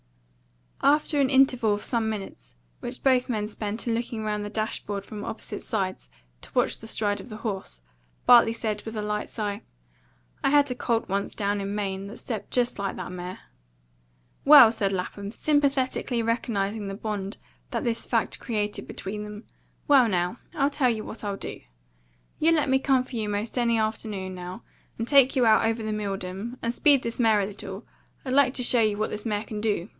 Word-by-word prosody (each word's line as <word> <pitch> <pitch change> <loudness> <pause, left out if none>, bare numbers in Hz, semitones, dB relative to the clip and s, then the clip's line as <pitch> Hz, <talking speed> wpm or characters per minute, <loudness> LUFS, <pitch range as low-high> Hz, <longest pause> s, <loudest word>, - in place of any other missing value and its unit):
After 295 0 +3
an 265 - +3
interval 255 -5 +4
of 205 - -7
some 230 -3 0
minutes, 195 - -7 0.2
which - - -7
both 255 -2 +3
men 215 -3 0
spent 210 +2 -5
in 230 - +2
looking 230 -1 -3
round 210 -1 -2
the 205 - -4
dash 215 +1 -2
board 200 -1 -4
from 210 0 -7
opposite - - -6
sides 190 - -3 0.3
to - - -12
watch - - +2
the 225 - -10
stride 205 -2 -1
of 250 - -13
the 215 - -7
horse, 190 - -5 0.4
Bartley 240 -2 +7
said, 215 -2 -3
with 220 0 -7
a 210 - -2
light 210 0 -2
sigh, 205 -2 -3 0.8
"I - - +4
had 285 -1 +4
a - - -2
colt 235 -2 0
once 200 +1 -2
down 205 0 0
in 200 +1 -3
Maine 195 -1 -3
that 215 - -9
stepped 220 -5 -5
just 245 -3 0
like 195 -1 -2
that 180 -1 -6
mare." 180 +1 -7 1.0
"Well!" 275 -6 +10
said 200 -4 0
Lapham, 200 +2 -4
sympathetically 270 -2 +1
recognising 220 -3 -1
the 195 - -4
bond 200 -2 -4 0.3
that - - -2
this 235 -1 -2
fact - - 0
created 210 -3 -2
between 210 +2 -5
them. 210 +1 -8 0.4
"Well, 270 -4 +6
now, 180 +3 0 0.2
I 275 -2 +3
tell 280 -3 +2
you 220 -2 -1
what 220 - -7
you 200 -2 -3
do. - - -7 0.8
You 325 +2 +4
let 300 -4 +2
me 265 0 +4
come 265 -1 +2
for 255 -1 -7
you 215 -2 -2
'most 205 +2 -3
any 235 -2 +2
afternoon, 215 -3 -2
now, 180 +4 -7 0.3
and 230 - -3
take 275 -1 +5
you 255 -2 +4
out 220 -1 +5
over 225 0 0
the 215 0 -2
Milldam, 200 +2 -4
and 230 +1 -2
speed 280 0 +4
this 230 +1 -4
mare 220 -3 +4
a - - 0
little. 195 +1 -8 0.4
I'd 255 - -2
like 275 -2 +4
to 250 - 0
show 240 -1 +4
you 215 -2 +2
what 215 - -1
this 210 +2 -4
mare 210 -1 -1
can 210 -1 -6
do. 210 -3 -1
220 Hz, 200 wpm, -26 LUFS, 205-245 Hz, 1.0 s, Well